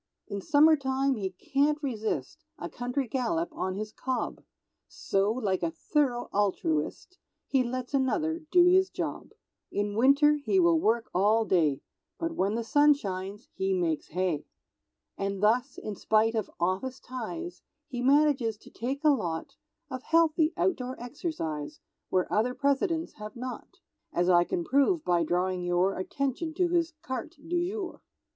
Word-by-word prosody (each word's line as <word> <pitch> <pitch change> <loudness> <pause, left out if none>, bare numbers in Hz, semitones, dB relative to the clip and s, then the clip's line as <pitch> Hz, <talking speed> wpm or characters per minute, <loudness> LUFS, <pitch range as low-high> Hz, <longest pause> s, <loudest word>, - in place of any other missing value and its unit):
In 200 0 -4
summertime 275 -1 +4
he 200 -6 -2
can't 280 +10 +1
resist 220 - -3
A 170 - -5
country 250 +2 -3
gallop 275 +8 -1
on 185 0 -2
his 215 +1 -4
cob, 260 +2 -3 0.5
So, 195 +2 0
like 210 -6 -1
a 170 - +1
thorough 245 - 0
altruist, 195 - -1 0.3
He 265 -2 +2
lets 250 +2 -4
another 310 +5 +1
do 355 0 +6
his 375 +1 +5
job; - - -4 0.4
In 205 0 -1
winter 280 +5 +5
he 380 - +2
will 340 -2 +4
work 235 -2 +1
all 215 +5 +3
day, 155 -9 +2 0.4
But 330 0 -2
when 205 -7 0
the 230 - -1
sun 290 +5 +5
shines 195 -2 -6
he 190 0 0
makes 165 -4 -1
Hay. 180 -3 -1 0.7
And 195 0 -2
thus, 235 +4 +2
in 210 - -5
spite 220 +3 +2
of 220 -2 -2
office 190 +10 -1
ties, 295 +8 -6 0.3
He 245 -1 -4
manages 270 -4 +3
to - - -17
take 270 +5 -4
a 305 - +6
lot 170 - -2 0.4
Of 255 -1 -4
healthy 325 +1 +3
outdoor 260 -9 -1
exercise, 235 - -4 0.3
Where 185 -1 +2
other 240 +4 +1
Presidents 295 +5 0
have 210 0 -7
not; 250 +1 -7 0.3
As 175 +1 +1
I 175 -1 +5
can 175 - -2
prove 280 - +2
by 175 -1 +3
drawing 180 +2 0
your 175 +2 +1
Attention 275 - -3
to 355 0 +2
his 340 -1 +1
carte 260 +6 -5
du 350 +1 0
jour. 395 -3 -5
245 Hz, 150 wpm, -28 LUFS, 195-295 Hz, 0.7 s, do